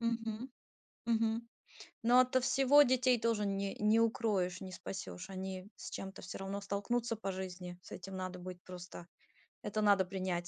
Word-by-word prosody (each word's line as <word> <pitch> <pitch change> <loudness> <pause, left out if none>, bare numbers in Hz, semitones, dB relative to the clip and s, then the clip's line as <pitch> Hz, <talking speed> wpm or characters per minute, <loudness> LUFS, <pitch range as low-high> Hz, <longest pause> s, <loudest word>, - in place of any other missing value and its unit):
Мгм, 230 +1 -2 0.6
мгм. 230 0 +1 0.6
Но 240 +2 +7
ото 255 0 +2
всего 275 +3 +6
детей 255 -2 +3
тоже 225 -2 +1
не 195 0 -1
не 215 +2 +4
укроешь, 210 -6 +1
не 190 -1 -6
спасёшь. 185 0 -6
Они 190 0 -5
с - - -7
чем-то, 195 0 -6
всё 185 - -6
равно, 195 +1 -3
столкнутся 230 +4 -1
по 200 -2 -3
жизни. 180 -1 -6
С - - -13
этим 190 +1 -7
надо 185 -1 -4
быть 180 0 -7
просто, 180 -1 -9 0.6
это 215 +1 -1
надо 200 -2 +5
принять. 185 -2 -2
200 Hz, 160 wpm, -35 LUFS, 185-230 Hz, 0.6 s, Но